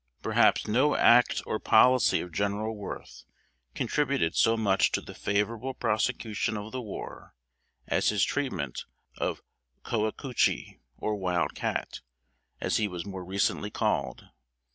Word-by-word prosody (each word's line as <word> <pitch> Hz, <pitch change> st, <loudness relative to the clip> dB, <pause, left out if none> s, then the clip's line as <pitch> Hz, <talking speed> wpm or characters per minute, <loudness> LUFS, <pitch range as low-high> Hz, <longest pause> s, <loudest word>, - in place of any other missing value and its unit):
Perhaps -, -, +3 dB
no 130 Hz, +8 st, +3 dB
act 120 Hz, +1 st, +5 dB
or 110 Hz, -, -2 dB
policy 125 Hz, +3 st, +4 dB
of 90 Hz, -, -8 dB
General 100 Hz, +4 st, -1 dB
Worth 105 Hz, -2 st, -8 dB, 0.5 s
contributed 135 Hz, -, 0 dB
so 115 Hz, 0 st, +4 dB
much 100 Hz, -3 st, +2 dB
to -, -, +2 dB
the -, -, -10 dB
favorable 115 Hz, +5 st, -1 dB
prosecution 110 Hz, -2 st, -1 dB
of 105 Hz, +1 st, -7 dB
the 130 Hz, -, -4 dB
war, 105 Hz, -5 st, -8 dB, 0.5 s
as -, -, +1 dB
his 105 Hz, -2 st, +2 dB
treatment 95 Hz, -, -2 dB, 0.3 s
of -, -, -2 dB, 0.4 s
Coacoochee, 115 Hz, +3 st, -1 dB, 0.2 s
or 110 Hz, -, -2 dB
Wild 90 Hz, -3 st, 0 dB
Cat, -, -, -3 dB, 0.6 s
as -, -, 0 dB
he 105 Hz, -, +1 dB
was 90 Hz, -3 st, -6 dB
more 95 Hz, -2 st, -6 dB
recently 100 Hz, +2 st, -1 dB
called. -, -, -1 dB
105 Hz, 130 wpm, -28 LUFS, 100-120 Hz, 0.6 s, act